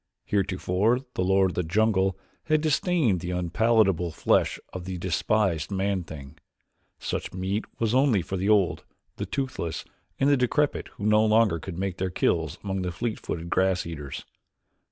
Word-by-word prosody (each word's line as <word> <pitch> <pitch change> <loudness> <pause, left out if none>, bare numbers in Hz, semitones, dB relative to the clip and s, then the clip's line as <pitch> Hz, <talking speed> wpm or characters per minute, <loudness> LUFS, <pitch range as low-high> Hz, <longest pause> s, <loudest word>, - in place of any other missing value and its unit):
Heretofore 100 +4 +1
the 90 - -1
lord 95 0 +3
of - - -10
the - - 0
jungle 95 +2 +1 0.3
had 155 -1 +2
disdained 155 - +2
the 85 - -5
unpalatable 90 0 +2
flesh 80 - +1 0.2
of 90 -2 -6
the 95 -1 -4
despised 90 -1 0
man 100 -1 -1
thing. 75 -1 -10 0.6
Such - - -4
meat 95 +3 -2
was 115 -1 0
only 130 -8 +3
for 95 - -4
the 95 +2 0
old, 100 -4 +3 0.3
the - - -4
toothless, 130 - -3 0.3
and 135 - +3
the 145 -1 +5
decrepit 135 +4 +1
who 100 - -8
no 105 0 +5
longer 110 -5 +3
could 85 +1 -7
make 95 -1 -2
their 95 0 -1
kills 80 -2 0
among 95 -1 -2
the 90 -1 -2
fleet 115 +6 -3
footed 85 +1 -5
grass 95 -1 +2
eaters. 75 -5 -6
95 Hz, 165 wpm, -26 LUFS, 90-110 Hz, 0.6 s, the